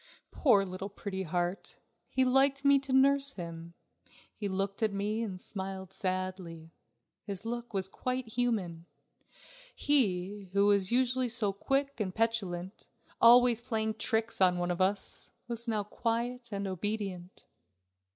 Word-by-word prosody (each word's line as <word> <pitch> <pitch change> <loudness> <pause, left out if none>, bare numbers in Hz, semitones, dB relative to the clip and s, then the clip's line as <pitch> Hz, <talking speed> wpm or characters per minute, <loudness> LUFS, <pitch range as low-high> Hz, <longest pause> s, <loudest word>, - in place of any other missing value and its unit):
Poor 210 -9 +4
little 185 +1 -6
Pretty 200 -1 -5
Heart! 175 +2 -3 0.3
he 260 - +2
liked 275 +2 +3
me 280 0 +6
to 270 0 -7
nurse 275 +1 +4
him. 170 -3 -8 0.6
He 205 - -4
looked 195 +2 -2
at 220 -1 +2
me 205 +3 -2
and 195 -5 -4
smiled 190 -1 -5
sadly. 185 -4 -4 0.5
His 200 +1 -6
look 240 +1 -4
was 190 -3 -1
quite 255 +4 -3
human. 205 -9 -1 0.9
He, 200 -8 0
who 200 0 +4
was 200 -1 +3
usually 255 0 +2
so 220 -4 +1
quick 275 +6 -1
and 185 -4 -2
petulant, 200 -5 -2 0.3
always 240 0 +7
playing 220 -2 -1
tricks 220 0 -1
on 180 -1 +5
one 175 0 -1
of 175 +1 -2
us, 195 +1 0 0.2
was 235 0 -3
now 215 -2 0
quiet 235 +3 -2
and 200 0 -3
obedient. 190 -1 -4
205 Hz, 140 wpm, -31 LUFS, 185-240 Hz, 0.9 s, always